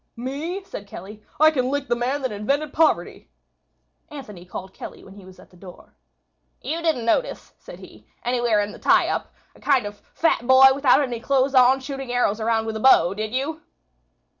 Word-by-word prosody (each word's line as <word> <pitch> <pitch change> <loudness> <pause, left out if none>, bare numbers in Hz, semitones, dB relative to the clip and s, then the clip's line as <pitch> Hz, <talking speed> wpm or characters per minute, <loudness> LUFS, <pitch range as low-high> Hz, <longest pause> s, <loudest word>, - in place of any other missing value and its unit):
"Me?" 290 +10 -5
said 205 - -9
Kelly. 205 +3 -10 0.2
"I 310 +1 +6
can 255 -4 -1
lick 285 0 -2
the 240 - +1
man 260 +4 -2
that 260 - -1
invented 275 +9 -2
poverty." 320 0 0 0.8
Anthony 210 -12 -10
called 190 +1 -9
Kelly - - -10
when 190 - -14
he 200 -2 -14
was 185 0 -15
at - - -18
the - - -20
door. 180 0 -15 0.6
"You 330 +2 -4
didn't 315 -8 0
notice," - - -1
said - - -12
he, - - -16 0.2
"anywhere 240 -3 +1
in 205 0 -4
the - - -12
tie - - +3
up, - - -3 0.2
a - - -20
kind 270 -6 +1
of 205 0 -8
a - - -36
fat 320 -7 +1
boy 260 +1 +8
without 275 0 +3
any 245 -4 -4
clothes 270 +2 +1
on 260 +1 +5
shooting 270 -1 -6
arrows 235 -3 0
around 225 0 0
with 220 0 -4
a - - -6
bow, 195 -8 +5
did 215 +1 -4
you?" 285 +6 -3
250 Hz, 200 wpm, -22 LUFS, 215-280 Hz, 0.8 s, boy